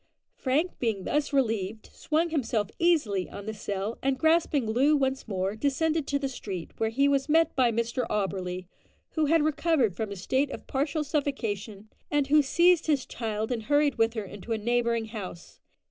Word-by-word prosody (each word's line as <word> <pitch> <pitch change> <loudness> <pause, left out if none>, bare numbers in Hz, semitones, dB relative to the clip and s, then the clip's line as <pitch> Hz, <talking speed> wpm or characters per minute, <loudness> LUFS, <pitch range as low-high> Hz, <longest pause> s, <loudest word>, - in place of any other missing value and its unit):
Frank 295 +7 0
being 220 -6 -1
thus 295 +8 0
relieved, 225 -6 -1
swung 325 +2 0
himself 225 -9 -1
easily 280 - +2
on 200 - -8
the 220 - -4
sill, 205 +1 -4
and 270 0 +1
grasping 315 -3 +2
Loo 265 +7 +3
once 265 -1 -1
more, 195 0 -2
descended 300 +5 0
to 285 - +1
the 280 -1 -2
street, 195 -9 -6
where 220 - +1
he 275 +5 +2
was 280 +1 +1
met 325 +1 +3
by 250 -3 +3
Mr 235 +2 -1
Auberly, 185 -3 -2 0.5
who 315 -2 +1
had 325 0 +4
recovered 305 - +2
from 220 +2 -3
his 200 -2 -7
state 270 +7 +1
of - - -8
partial 290 +3 -1
suffocation, 225 -9 -3 0.2
and 290 -2 +2
who 300 +1 +6
seized 340 +4 +3
his 290 -4 +2
child 220 0 -3
and 225 -3 -2
hurried 290 -1 +2
with 225 +1 +2
her 220 - -2
into 205 +4 -6
a - - 0
neighbouring 235 +1 0
house. 195 -6 -8
250 Hz, 180 wpm, -28 LUFS, 215-295 Hz, 0.5 s, who